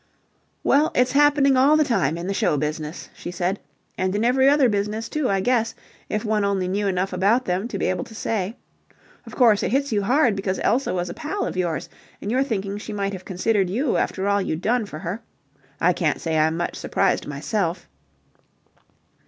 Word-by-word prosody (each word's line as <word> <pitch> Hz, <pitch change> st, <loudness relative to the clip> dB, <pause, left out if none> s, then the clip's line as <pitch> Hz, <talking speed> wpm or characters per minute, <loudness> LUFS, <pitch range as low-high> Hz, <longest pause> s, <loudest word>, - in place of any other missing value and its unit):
"Well, 295 Hz, +3 st, +4 dB
it's 250 Hz, 0 st, +3 dB
happening 285 Hz, -1 st, +4 dB
all 280 Hz, +4 st, +5 dB
the 310 Hz, -, +4 dB
time 185 Hz, -, 0 dB
in 170 Hz, -, -5 dB
the 195 Hz, -, -1 dB
show 150 Hz, -, +1 dB
business," 150 Hz, +2 st, -4 dB
she -, -, -8 dB
said. 180 Hz, +2 st, -2 dB, 0.4 s
"And 185 Hz, +1 st, 0 dB
in 215 Hz, +3 st, +1 dB
every 265 Hz, +2 st, +4 dB
other 285 Hz, -2 st, +4 dB
business, 210 Hz, +1 st, -1 dB
too, 305 Hz, -4 st, -1 dB
I 195 Hz, -1 st, +1 dB
guess, 230 Hz, +1 st, +1 dB, 0.3 s
if 210 Hz, +2 st, -2 dB
one 215 Hz, -1 st, +1 dB
only 195 Hz, -2 st, 0 dB
knew 200 Hz, +2 st, -1 dB
enough 190 Hz, 0 st, -1 dB
about 205 Hz, +8 st, +2 dB
them 185 Hz, +5 st, -1 dB
to -, -, -5 dB
be -, -, -1 dB
able 185 Hz, -, 0 dB
to 220 Hz, -, -13 dB
say. 215 Hz, 0 st, -2 dB, 0.7 s
Of -, -, -9 dB
course, 225 Hz, -5 st, +5 dB
it -, -, 0 dB
hits 275 Hz, +2 st, +1 dB
you 210 Hz, -2 st, +1 dB
hard 245 Hz, +1 st, +3 dB
because 195 Hz, -1 st, -2 dB
Elsa 255 Hz, +5 st, +1 dB
was 175 Hz, -1 st, -2 dB
a -, -, -6 dB
pal 350 Hz, +6 st, -3 dB
of -, -, -4 dB
yours, 175 Hz, -4 st, -1 dB, 0.3 s
and 205 Hz, -, -4 dB
you're 255 Hz, +2 st, +2 dB
thinking 205 Hz, -6 st, -2 dB
she 215 Hz, 0 st, -7 dB
might 200 Hz, -1 st, -2 dB
have 185 Hz, -1 st, -8 dB
considered 195 Hz, 0 st, 0 dB
you 245 Hz, +8 st, 0 dB
after 190 Hz, +1 st, -1 dB
all 200 Hz, 0 st, +2 dB
you've 160 Hz, -3 st, -3 dB
done 230 Hz, +2 st, +1 dB
for 155 Hz, -, -8 dB
her. 180 Hz, +6 st, -5 dB, 0.6 s
I 180 Hz, +2 st, +3 dB
can't 160 Hz, -3 st, 0 dB
say 160 Hz, -1 st, -2 dB
I'm 160 Hz, +1 st, +2 dB
much 175 Hz, -, -2 dB
surprised -, -, 0 dB
myself." 165 Hz, +5 st, -2 dB
200 Hz, 205 wpm, -23 LUFS, 185-245 Hz, 0.7 s, all